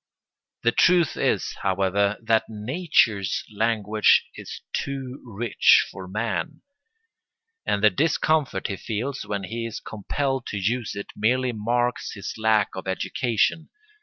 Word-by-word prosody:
The 115 Hz, -, +4 dB
truth 170 Hz, +4 st, +4 dB
is, -, -, 0 dB
however, 100 Hz, +2 st, +1 dB
that 110 Hz, 0 st, +2 dB
nature's 110 Hz, -, +1 dB
language 110 Hz, -1 st, +3 dB
is -, -, -9 dB
too 135 Hz, -1 st, -4 dB
rich 115 Hz, -1 st, +3 dB
for 95 Hz, -2 st, -9 dB
man; 115 Hz, -, -3 dB, 1.0 s
and 100 Hz, -, 0 dB
the 105 Hz, -, +7 dB
discomfort 155 Hz, -, +1 dB
he 100 Hz, -, -2 dB
feels 115 Hz, +4 st, -4 dB
when 100 Hz, -1 st, -3 dB
he 115 Hz, +4 st, -4 dB
is 115 Hz, -, -6 dB
compelled 135 Hz, +5 st, -3 dB
to 105 Hz, -, -4 dB
use 115 Hz, +4 st, -1 dB
it 100 Hz, -, -6 dB
merely 125 Hz, +4 st, +1 dB
marks 120 Hz, +2 st, -1 dB
his 100 Hz, -, -6 dB
lack 110 Hz, -2 st, +2 dB
of 95 Hz, 0 st, -7 dB
education. 115 Hz, -, 0 dB
110 Hz, 130 wpm, -24 LUFS, 100-125 Hz, 1.0 s, the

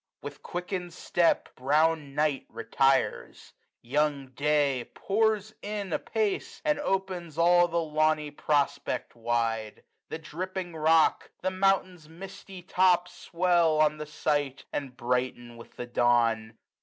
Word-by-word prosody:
With 145 Hz, -1 st, -8 dB
quickened 180 Hz, 0 st, -5 dB
step. 175 Hz, -1 st, +1 dB
Brown 150 Hz, +1 st, +1 dB
Night 150 Hz, -2 st, 0 dB
retires: 135 Hz, +3 st, 0 dB, 0.3 s
young 140 Hz, +1 st, 0 dB
Day 140 Hz, -1 st, 0 dB
pours 215 Hz, 0 st, 0 dB
in 205 Hz, -4 st, -4 dB
apace, 215 Hz, -3 st, -2 dB
And 300 Hz, -1 st, +2 dB
opens 185 Hz, -, -3 dB
all 175 Hz, +1 st, +5 dB
the 170 Hz, 0 st, -1 dB
lawny 155 Hz, -1 st, +1 dB
prospect 145 Hz, -3 st, -1 dB
wide. 115 Hz, -2 st, -2 dB, 0.3 s
The -, -, -4 dB
dripping 175 Hz, +2 st, -6 dB
rock, 160 Hz, +1 st, +3 dB
the 185 Hz, -, 0 dB
mountain's 185 Hz, -4 st, 0 dB
misty 190 Hz, +2 st, -10 dB
top 180 Hz, -1 st, +3 dB
Swell 170 Hz, -3 st, +1 dB
on 155 Hz, 0 st, +3 dB
the 150 Hz, 0 st, -6 dB
sight, 145 Hz, -2 st, -1 dB
and 135 Hz, -3 st, -4 dB
brighten 120 Hz, -1 st, -2 dB
with 115 Hz, -, -14 dB
the 125 Hz, -, -5 dB
dawn. 115 Hz, -2 st, +1 dB
155 Hz, 120 wpm, -28 LUFS, 135-180 Hz, 0.3 s, all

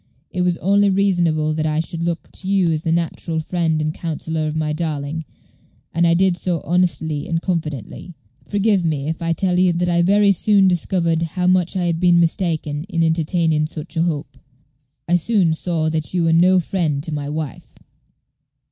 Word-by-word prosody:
It 180 Hz, -, -2 dB
was 180 Hz, -1 st, +1 dB
only 200 Hz, +2 st, +3 dB
reasonable 175 Hz, -6 st, +1 dB
that 155 Hz, 0 st, -1 dB
I 155 Hz, 0 st, 0 dB
should 165 Hz, 0 st, -3 dB
look 170 Hz, 0 st, -3 dB
to 185 Hz, -, -7 dB
you 190 Hz, -3 st, +2 dB
as 155 Hz, -1 st, -1 dB
the 165 Hz, -, -1 dB
natural 165 Hz, -1 st, -1 dB
friend 160 Hz, -1 st, -1 dB
and 155 Hz, 0 st, -1 dB
counsellor 160 Hz, -1 st, -3 dB
of 155 Hz, -, -3 dB
my 155 Hz, -1 st, -1 dB
darling, 155 Hz, -1 st, -3 dB, 0.7 s
and 170 Hz, +1 st, +2 dB
I 170 Hz, -, +4 dB
did 185 Hz, 0 st, +3 dB
so 175 Hz, -5 st, -2 dB
honestly 160 Hz, -3 st, 0 dB
and 165 Hz, -1 st, 0 dB
confidently. 165 Hz, -, -4 dB, 0.3 s
Forgive 205 Hz, -2 st, +1 dB
me 150 Hz, -4 st, -1 dB
if 160 Hz, -, -4 dB
I 165 Hz, 0 st, -1 dB
tell 180 Hz, +1 st, 0 dB
you 185 Hz, -1 st, +4 dB
that 175 Hz, +1 st, 0 dB
I 170 Hz, 0 st, +2 dB
very 200 Hz, +3 st, +4 dB
soon 200 Hz, +1 st, +3 dB
discovered 170 Hz, -2 st, 0 dB
how 175 Hz, +2 st, -2 dB
much 180 Hz, 0 st, +2 dB
I 180 Hz, -, 0 dB
had 170 Hz, -1 st, 0 dB
been 175 Hz, -1 st, +4 dB
mistaken 160 Hz, -4 st, -1 dB
in 170 Hz, -4 st, -1 dB
entertaining 160 Hz, -1 st, +1 dB
such 155 Hz, +1 st, -8 dB
a 165 Hz, -, +1 dB
hope. 160 Hz, -4 st, -3 dB, 0.7 s
I 175 Hz, +1 st, +3 dB
soon 180 Hz, -3 st, +2 dB
saw 160 Hz, -1 st, -1 dB
that 160 Hz, +3 st, -3 dB
you 175 Hz, -, +2 dB
were 165 Hz, 0 st, +2 dB
no 180 Hz, +3 st, +5 dB
friend 160 Hz, -6 st, -1 dB
to 160 Hz, -, -4 dB
my 145 Hz, -1 st, -3 dB
wife." 150 Hz, -2 st, -6 dB
170 Hz, 190 wpm, -20 LUFS, 155-180 Hz, 0.7 s, no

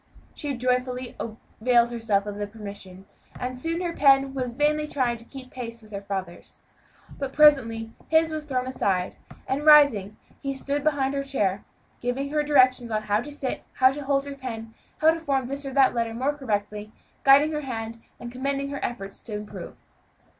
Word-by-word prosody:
She 285 Hz, -2 st, -4 dB
joyfully 250 Hz, 0 st, -1 dB
availed 235 Hz, +1 st, 0 dB
herself 220 Hz, -4 st, 0 dB
of 205 Hz, -1 st, -5 dB
the 205 Hz, 0 st, -3 dB
permission, 200 Hz, -3 st, -10 dB, 0.3 s
and 255 Hz, +1 st, -3 dB
soon 330 Hz, +7 st, -2 dB
her 345 Hz, -2 st, -2 dB
pen 275 Hz, -2 st, +4 dB
was 250 Hz, -3 st, -3 dB
vainly 300 Hz, +2 st, +1 dB
trying 250 Hz, -5 st, 0 dB
to 230 Hz, -, -14 dB
keep 260 Hz, 0 st, -10 dB
pace 230 Hz, -2 st, -7 dB
with 215 Hz, -, -17 dB
her 200 Hz, -1 st, -5 dB
father's. 190 Hz, -3 st, -6 dB, 0.6 s
But 275 Hz, -1 st, -3 dB
presently 230 Hz, -7 st, +4 dB, 0.2 s
his 320 Hz, 0 st, +3 dB
was 310 Hz, -1 st, -4 dB
thrown 255 Hz, -3 st, -1 dB
aside, 195 Hz, -8 st, -1 dB, 0.3 s
and 275 Hz, +3 st, -1 dB
rising, 285 Hz, -10 st, +6 dB, 0.2 s
he 275 Hz, 0 st, -3 dB
stood 280 Hz, +2 st, -2 dB
behind 280 Hz, -3 st, +1 dB
her 280 Hz, -, 0 dB
chair, 205 Hz, -8 st, -1 dB, 0.4 s
giving 265 Hz, +3 st, -2 dB
her 300 Hz, 0 st, +2 dB
directions 255 Hz, -4 st, +4 dB
how 215 Hz, -1 st, 0 dB
to 295 Hz, -, -8 dB
sit, 285 Hz, -3 st, -4 dB
how 260 Hz, 0 st, +5 dB
to 290 Hz, +2 st, -6 dB
hold 275 Hz, 0 st, +1 dB
the 285 Hz, 0 st, -6 dB
pen, 230 Hz, -5 st, -7 dB, 0.2 s
how 315 Hz, +1 st, +5 dB
to 330 Hz, -, -3 dB
form 275 Hz, -5 st, 0 dB
this 275 Hz, +2 st, -4 dB
or 270 Hz, -, -5 dB
that 270 Hz, -2 st, +5 dB
letter 230 Hz, -1 st, -1 dB
more 265 Hz, +5 st, 0 dB
correctly, 210 Hz, -5 st, -3 dB, 0.3 s
guiding 280 Hz, +3 st, +6 dB
her 300 Hz, -1 st, -2 dB
hand, 230 Hz, -4 st, -5 dB, 0.2 s
and 240 Hz, -, -7 dB
commending 275 Hz, +2 st, -2 dB
her 280 Hz, -, -5 dB
efforts 195 Hz, -5 st, -5 dB
to 215 Hz, -, -7 dB
improve. 210 Hz, 0 st, -8 dB
255 Hz, 180 wpm, -25 LUFS, 225-280 Hz, 0.6 s, rising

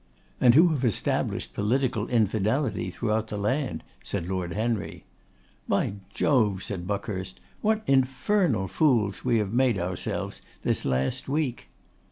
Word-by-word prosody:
'And 120 Hz, -1 st, +6 dB
who 170 Hz, +4 st, +7 dB
have 145 Hz, -5 st, -1 dB
established 115 Hz, -6 st, 0 dB
political 115 Hz, +1 st, 0 dB
infidelity 110 Hz, 0 st, +1 dB
throughout 110 Hz, +3 st, -1 dB
the 105 Hz, -, -4 dB
land,' 130 Hz, +7 st, -1 dB, 0.2 s
said 90 Hz, -4 st, -3 dB
Lord 90 Hz, -2 st, -2 dB
Henry. 110 Hz, 0 st, -2 dB, 0.6 s
'By 100 Hz, -, 0 dB
Jove!' 105 Hz, -9 st, +2 dB
said 90 Hz, -3 st, -4 dB
Buckhurst, 95 Hz, -2 st, -4 dB, 0.2 s
'what 215 Hz, 0 st, +1 dB
infernal 135 Hz, -, +2 dB
fools 115 Hz, -7 st, +2 dB
we 120 Hz, -2 st, +2 dB
have 105 Hz, -1 st, -1 dB
made 125 Hz, -3 st, +3 dB
ourselves 90 Hz, 0 st, -3 dB, 0.2 s
this -, -, 0 dB
last 65 Hz, -, 0 dB
week! 140 Hz, -4 st, -1 dB
110 Hz, 130 wpm, -27 LUFS, 100-130 Hz, 0.6 s, who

